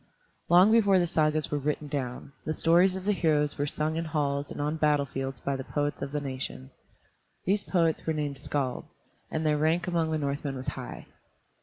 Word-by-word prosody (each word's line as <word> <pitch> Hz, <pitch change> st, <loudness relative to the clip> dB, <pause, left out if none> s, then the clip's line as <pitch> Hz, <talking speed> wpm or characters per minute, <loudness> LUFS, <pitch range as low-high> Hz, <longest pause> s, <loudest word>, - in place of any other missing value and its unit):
Long 180 Hz, +5 st, +7 dB
before 205 Hz, -4 st, +5 dB
the 175 Hz, -, +3 dB
Sagas 155 Hz, -2 st, +1 dB
were 145 Hz, -, 0 dB
written 150 Hz, +1 st, -2 dB
down, 135 Hz, -2 st, -4 dB
the 155 Hz, -, -2 dB
stories 175 Hz, +3 st, +4 dB
of 190 Hz, 0 st, -6 dB
the 210 Hz, -, +3 dB
heroes 150 Hz, -7 st, +2 dB
were 145 Hz, -, +1 dB
sung 155 Hz, +2 st, -1 dB
in 165 Hz, -, -2 dB
halls 145 Hz, -3 st, -1 dB
and -, -, -7 dB
on 150 Hz, +2 st, -1 dB
battle 150 Hz, -2 st, +3 dB
fields 135 Hz, -1 st, -5 dB
by 140 Hz, -, -2 dB
the 135 Hz, -, -4 dB
poets 145 Hz, +2 st, -2 dB
of 140 Hz, 0 st, -4 dB
the 150 Hz, -, -1 dB
nation. 130 Hz, -1 st, -6 dB, 0.7 s
These 200 Hz, +2 st, +1 dB
poets 165 Hz, -4 st, +1 dB
were 160 Hz, -, +2 dB
named 145 Hz, -3 st, -3 dB
skalds, 135 Hz, -2 st, -2 dB, 0.4 s
and 160 Hz, 0 st, -2 dB
their 150 Hz, -1 st, +2 dB
rank 165 Hz, +3 st, +2 dB
among 170 Hz, -2 st, +1 dB
the 160 Hz, -, 0 dB
Northmen 140 Hz, -1 st, -2 dB
was 130 Hz, 0 st, -3 dB
high. -, -, -7 dB
150 Hz, 200 wpm, -28 LUFS, 140-165 Hz, 0.7 s, Long